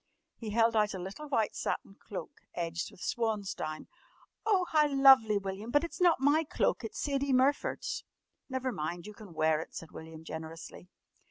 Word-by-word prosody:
He 225 - -6
held 225 +1 +3
out 210 -2 +2
a - - -5
little 195 +12 -7
white 225 -6 +1
satin - - -3
cloak 195 -4 -8
edged 170 0 -2
with 180 - -17
swansdown. 205 -9 -2 0.6
"Oh, 385 -4 +4
how 305 -1 +5
lovely, 270 -6 +7
William! 195 +3 -4
But 290 +5 +3
it's 340 - -6
not 350 -5 +5
my 290 +4 +4
cloak! 300 - 0
It's 445 - -6
Sadie 280 -1 0
Murford's!" 280 - +1 0.5
"Never 260 -1 -1
mind! 170 -2 -4
you 210 - -8
can 205 -6 -12
wear 155 0 +3
it," - - -10
said 165 - -7
William 160 0 -10
generously. 160 +2 -8
215 Hz, 170 wpm, -31 LUFS, 175-275 Hz, 0.6 s, lovely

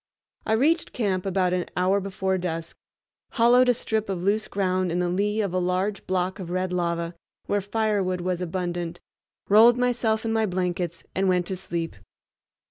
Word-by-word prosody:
I 220 - +2
reached 305 +9 +2
camp 195 -5 -1
about 185 -1 +1
an 180 -1 -1
hour 185 +2 +3
before 190 -1 -1
dusk, 165 -2 -4 0.6
hollowed 245 +1 +5
a - - +6
strip 220 -2 -2
of 180 -2 -3
loose 210 +3 +1
ground 185 -2 0
in 170 - -1
the 180 0 0
lee 210 +4 0
of 200 -4 -2
a 185 - +1
large 185 +3 -1
block 185 +2 -1
of 180 -3 -6
red 185 0 -1
lava, 170 -1 -1 0.3
where 205 0 0
firewood 200 -3 0
was 180 0 -2
abundant, 175 -1 -3 0.5
rolled 225 +4 +7
myself 240 -3 +1
in 225 - 0
my 220 -1 +2
blankets, 180 -2 -2
and 190 0 +1
went 180 -1 +2
to 190 - -3
sleep. 170 - -4
185 Hz, 175 wpm, -25 LUFS, 180-210 Hz, 0.6 s, rolled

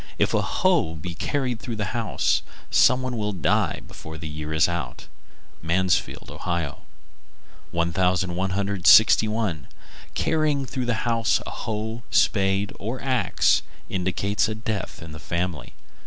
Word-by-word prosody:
If - - +2
a - - +3
hoe 175 - +1
be 85 +3 -6
carried 125 +4 -2
through 115 -2 -5
a 105 - -1
house, 115 +2 0 0.3
some 130 0 +5
one 125 -2 -3
will 105 -1 -1
die 90 -6 +1
before 80 0 -9
the 80 0 -6
year 75 0 -6
is 80 0 +4
out. 85 -2 -4 0.6
Mansfield, 90 +3 0
O. 85 -5 -3 0.9
1161. 95 - +3 0.5
Carrying 155 -3 +1
through 130 -1 -3
the 120 - +1
house 115 -2 +2
a - - -6
hoe, 110 +2 -4
spade, 100 -1 +2
or 115 +6 -4
axe 130 -2 +2 0.3
indicates 100 +4 0
a 110 - -3
death 110 -6 -4
in 80 - -9
the 80 - -9
family. 85 0 -3
100 Hz, 130 wpm, -24 LUFS, 85-115 Hz, 0.9 s, some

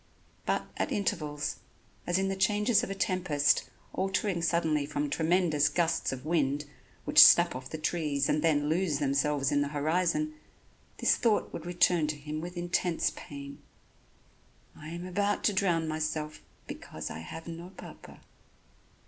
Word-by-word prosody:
But, - - 0
at - - -1
intervals, 150 - -2 0.5
as 175 - +2
in 195 0 +1
the 195 - -1
changes 210 +3 +2
of - - -4
a 195 - -3
tempest, 175 -7 +1 0.2
altering 190 -1 -1
suddenly 165 -3 +1
from 145 0 -2
tremendous 160 -3 +2
gusts 165 +1 0
of 130 +1 -7
wind, 150 -3 0 0.4
which - - +9
snap 170 -3 +6
off 130 0 -7
the 160 - -5
trees 150 -3 -1
and 150 - +1
then 145 -3 +2
lose 160 -1 +1
themselves 140 0 +1
in 145 0 +2
the 145 - 0
horizon, 170 - 0 0.6
this - - +3
thought 225 -3 +1
would - - -6
return 175 -2 +2
to 150 - -2
him 150 +1 -5
with 175 +1 -7
intense 175 -1 0
pain: 140 -1 -9 1.1
"I 155 - -11
am 170 +2 -6
about 200 +3 -1
to 210 - +3
drown 175 -4 +1
myself 155 0 -3 0.2
because - - -7
I - - -6
have 160 - -9
no 170 +1 -7
Papa." 195 - -13
165 Hz, 155 wpm, -29 LUFS, 150-180 Hz, 1.1 s, which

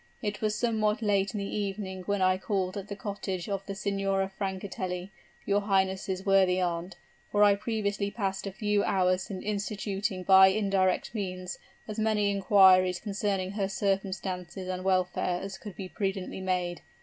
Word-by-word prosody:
It 205 -1 -3
was 215 -1 +1
somewhat 220 0 +1
late 200 -1 +1
in - - -1
the 200 - -2
evening 195 -2 -3
when 200 -2 +1
I 185 0 +3
called 190 -3 -1
at 200 -1 -5
the 200 - -5
cottage 195 -3 -4
of 195 -1 -2
the 195 - -4
Signora 195 0 -1
Francatelli, 190 -1 -4 0.3
your 205 0 +2
highness' 190 -1 0
worthy 190 -2 +4
aunt; 175 0 -2 0.4
for 205 0 +4
I 205 -1 +7
previously 200 -1 -1
passed 195 -2 -3
a - - -3
few 210 0 +1
hours 185 0 +1
in 190 -2 -5
instituting 200 -1 -2
by 190 +1 +8
indirect 195 -1 +1
means 185 -4 -4 0.3
as 215 0 -5
many 215 -2 +2
inquiries 190 -2 +5
concerning 200 -2 -2
her 200 -1 -1
circumstances 190 -2 -2
and 185 0 -3
welfare 185 -1 +1
as 195 0 -7
could 205 -5 -9
be 190 - -6
prudently 195 -1 -3
made. 180 -2 -1
195 Hz, 160 wpm, -29 LUFS, 185-205 Hz, 0.4 s, by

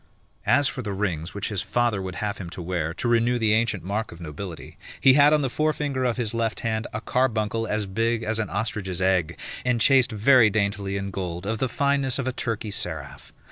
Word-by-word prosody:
As 145 -1 +5
for 130 - -3
the 105 -4 -4
rings 90 -4 -2
which 100 - -2
his 105 -4 -1
father 120 -5 0
would 95 -1 -5
have 105 -1 -3
him 90 -4 -6
to - - -5
wear, 85 -2 -2
to 120 - -2
renew 120 +1 +3
the 110 -2 +2
ancient 110 -4 +1
mark 105 +4 -3
of 85 - -11
nobility, 85 +2 -8 0.2
he 135 - +6
had 145 +1 +6
on 150 -1 +3
the - - +1
forefinger 145 -2 0
of 120 -1 0
his 120 -3 -2
left 115 -1 -1
hand 110 0 -1
a 105 - -3
carbuncle 115 -3 0
as 105 0 -1
big 115 +4 0
as 110 0 -1
an 110 - -2
ostrich's 100 -3 -2
egg, 90 -3 +1 0.3
enchased 125 +1 +3
very 115 +2 +5
daintily 100 -1 -1
in 100 0 -4
gold 90 -1 -4
of 110 +1 -2
the 130 - 0
fineness 140 0 +1
of 135 -2 -2
a 130 - -1
Turkey 115 -4 -3
seraph. - - -4
110 Hz, 215 wpm, -25 LUFS, 100-120 Hz, 0.3 s, he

